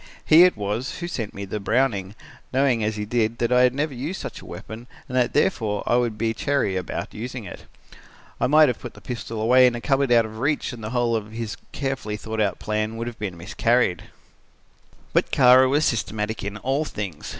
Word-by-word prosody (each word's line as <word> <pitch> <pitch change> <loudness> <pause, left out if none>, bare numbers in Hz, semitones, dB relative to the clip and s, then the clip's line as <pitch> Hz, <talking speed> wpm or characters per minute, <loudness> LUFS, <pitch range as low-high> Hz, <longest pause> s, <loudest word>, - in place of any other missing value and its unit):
He 165 +3 +8
it 180 - +2
was, 105 +5 -3
who 175 - -4
sent 115 - -4
me 100 0 -5
the 100 +2 -4
Browning, 105 -2 0 0.4
knowing 130 -4 +2
as 110 0 -1
he 105 0 -3
did 115 0 0
that 120 +1 0
I 125 0 +5
had 125 0 +4
never 145 +1 -1
used 145 +10 -4
such - - -7
a - - -13
weapon 115 +3 -9 0.2
and 125 - -6
that 125 -1 +2
therefore 110 - +1
I - - +2
would 120 -3 0
be 110 +1 0
chary 125 -5 0
about 90 -2 -4
using 125 +2 -6
it. 95 - -10 0.7
I - - +2
might 155 +3 +6
have 125 - -1
put 120 - -9
the - - -12
pistol 115 0 -6
away 125 +3 +6
in 120 - 0
a - - -4
cupboard 135 +1 +1
out 115 -2 +5
of 110 0 -9
reach 145 0 0
and 115 -2 -9
the 110 - -4
whole 120 -1 +1
of 110 -1 -4
his 115 -2 -4 0.2
carefully 135 -6 -3
thought 110 +1 -4
out 100 -3 0
plan 110 +1 -2
would 115 - -3
have 120 -2 -8
miscarried. 100 +2 0 1.1
"But - - +2
Kara 130 +1 +6
was 145 +3 +2
systematic 110 -1 -2
in 100 +1 -4
all 135 +7 0
things. 100 - -6
115 Hz, 215 wpm, -23 LUFS, 105-130 Hz, 1.1 s, He